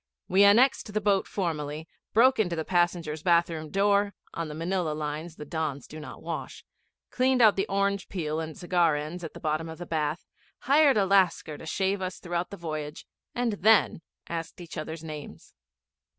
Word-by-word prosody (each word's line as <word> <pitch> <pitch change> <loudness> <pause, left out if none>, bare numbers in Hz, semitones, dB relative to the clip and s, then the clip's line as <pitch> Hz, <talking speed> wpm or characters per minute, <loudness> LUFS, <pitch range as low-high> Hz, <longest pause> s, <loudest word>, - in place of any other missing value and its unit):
We 190 +2 +5
annexed 220 +2 +5
the - - +3
boat 200 -2 +2
formally, 155 -4 -3 0.2
broke 255 +4 +5
open 210 -5 +2
the 165 -2 -3
passengers' 175 -3 0
bath 170 0 +3
room 155 -1 -5
door 200 +1 +2 0.2
on 165 -1 -3
the 150 - -7
Manilla 170 0 -1
lines 155 +2 -4
the 150 - -8
Dons 150 -3 -3
do 155 - -10
not 150 - -10
wash - - -6 0.5
cleaned 255 0 +2
out 220 -4 +6
the 195 - 0
orange 200 0 0
peel 160 -4 -2
and 160 -1 -5
cigar 175 -3 +2
ends 155 +4 -5
at 165 - -7
the - - -8
bottom 155 +1 -2
of 160 - -8
the 175 - -7
bath, 155 0 -2 0.4
hired 280 -1 +5
a 200 - +3
Lascar 185 -5 +2
to 160 - -9
shave 190 +3 0
us 185 0 -4
throughout 175 0 -3
the 200 - -8
voyage, 155 -3 -5 0.3
and 240 -2 0
then 215 -4 +4 0.3
asked 165 0 -5
each 175 -2 -9
other's 160 0 -6
names. 155 -2 -9
170 Hz, 185 wpm, -27 LUFS, 155-200 Hz, 0.5 s, out